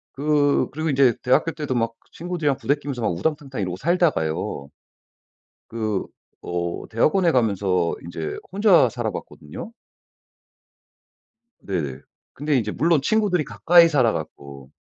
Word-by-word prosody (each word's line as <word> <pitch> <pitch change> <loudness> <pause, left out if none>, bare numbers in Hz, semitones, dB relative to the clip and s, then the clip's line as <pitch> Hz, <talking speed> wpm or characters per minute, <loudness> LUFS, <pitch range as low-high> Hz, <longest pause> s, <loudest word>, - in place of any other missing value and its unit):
그 145 0 +2
그리고 155 +3 -2
인제 135 -4 +4
대학교 130 +6 +2
때도 150 -5 -4
막 115 -1 -1 0.2
친구들이랑 170 -5 -2
부대끼면서 140 -2 -2
막 110 - +1
우당탕탕 135 - -3
이러고 90 -1 -3
살다가요. 95 - 0 1.0
그 110 -3 -2 0.4
어 85 0 -4
대학원에 165 - +2
가면서 100 -7 +1
인제 80 -2 -5 0.2
혼자 195 - +5
살아 115 -2 -3
봤거든요. 75 - -9 1.9
네네. 75 -9 -4 0.3
근데 150 +1 -1
이제 105 -3 -1
물론 160 +1 +2
친구들이 195 -1 +1
가까이 170 0 +5
살아 130 -8 +3
갖고 70 -4 -8
130 Hz, 290 characters per minute, -23 LUFS, 95-155 Hz, 1.9 s, 혼자